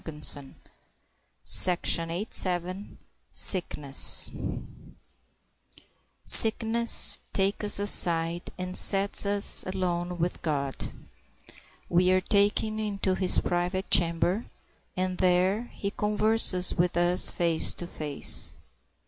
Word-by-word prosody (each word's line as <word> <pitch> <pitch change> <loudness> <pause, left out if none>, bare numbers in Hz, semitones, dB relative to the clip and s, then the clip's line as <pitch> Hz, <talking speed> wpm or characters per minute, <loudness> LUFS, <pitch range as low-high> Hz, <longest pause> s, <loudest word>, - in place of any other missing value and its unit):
[Illustration: 150 -3 -1 2.8
SICKNESS.] 150 -7 +3 1.9
Sickness 230 +1 +4
takes 195 +2 -3
us 205 - +2
aside 170 -4 +1
and 185 0 -8
sets 200 0 +4
us 200 0 +2
alone 180 -2 -5
with 175 +1 -5
God. 140 -4 -6 1.0
We 180 +1 0
are 185 - +1
taken 205 +3 -2
into 200 -3 -3
his 185 -1 -2
private 180 +2 -5
chamber, 175 +5 0 0.5
and 185 0 -4
there 185 +5 -1
he 200 - -7
converses 210 -3 0
with 175 0 -3
us 175 +1 +2
face 170 -2 -2
to 175 - -8
face. 150 -4 -1
185 Hz, 90 wpm, -24 LUFS, 175-200 Hz, 2.8 s, Sickness